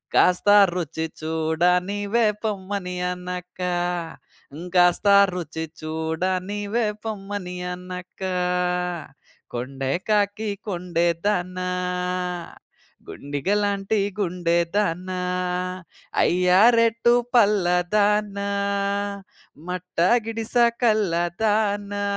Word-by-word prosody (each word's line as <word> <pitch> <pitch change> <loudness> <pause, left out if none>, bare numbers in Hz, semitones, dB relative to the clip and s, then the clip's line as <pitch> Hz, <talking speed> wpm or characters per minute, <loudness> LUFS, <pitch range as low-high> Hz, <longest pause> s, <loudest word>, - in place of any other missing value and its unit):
కాస్త 180 +3 +4 0.2
రుచి 160 -2 -3
చూడ 160 0 -2 0.3
నీవే 205 +3 0 0.2
పొమ్మని 195 -3 -3 0.2
అనక, 180 0 -7 1.2
కాస్త 180 +3 +4 0.3
రుచి 160 -2 -4 0.2
చూడ 160 +2 -3 0.3
నీవే 205 +2 -1 0.2
పొమ్మని 200 -4 -5 0.2
అనక, 180 +1 -9 1.3
కొండే 135 +2 -3 0.2
కాకి 210 +1 +1 0.2
కొండే 175 -2 0 0.2
దానా, 185 -2 -1 1.4
గుండిగలాంటి 200 +8 -1 0.2
గుండే 175 -3 0 0.2
దానా, 185 -2 -1 1.0
అయ్యా! 180 +1 +4 0.2
రేటు 230 +1 +3 0.2
పల్లాదానా, 205 0 +2 1.2
మట్టా 180 -1 0 0.2
గిడిస 225 0 -5 0.3
కల్లాదానా, 205 0 +1
185 Hz, 70 wpm, -23 LUFS, 175-205 Hz, 1.4 s, కాస్త